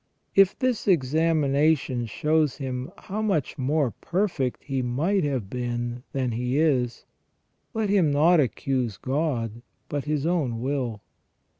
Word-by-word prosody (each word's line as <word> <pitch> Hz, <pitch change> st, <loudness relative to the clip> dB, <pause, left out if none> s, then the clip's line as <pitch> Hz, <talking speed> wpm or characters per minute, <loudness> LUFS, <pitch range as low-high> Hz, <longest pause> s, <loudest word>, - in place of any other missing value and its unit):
If 195 Hz, -1 st, +5 dB
this 255 Hz, -5 st, 0 dB
examina 155 Hz, -1 st, +3 dB
tion 125 Hz, -3 st, -4 dB
shows 155 Hz, +3 st, +1 dB
him 130 Hz, -2 st, -4 dB
how 210 Hz, +3 st, -5 dB
much 185 Hz, -, -1 dB
more 140 Hz, 0 st, +1 dB
perfect 170 Hz, -, -2 dB
he 135 Hz, -2 st, -2 dB
might 155 Hz, +11 st, +1 dB
have 130 Hz, -8 st, -1 dB
been 120 Hz, +1 st, -3 dB
than 130 Hz, -3 st, -1 dB
he 125 Hz, +3 st, -1 dB
is, 130 Hz, -6 st, +1 dB, 0.7 s
let 215 Hz, -2 st, 0 dB
him 185 Hz, -7 st, +4 dB
not 160 Hz, +4 st, +4 dB
accuse 130 Hz, -4 st, 0 dB
God 130 Hz, -5 st, -2 dB, 0.3 s
but 145 Hz, -1 st, -2 dB
his 150 Hz, -1 st, -1 dB
own 150 Hz, -10 st, 0 dB
will. 125 Hz, -4 st, -2 dB
140 Hz, 135 wpm, -25 LUFS, 125-160 Hz, 0.7 s, If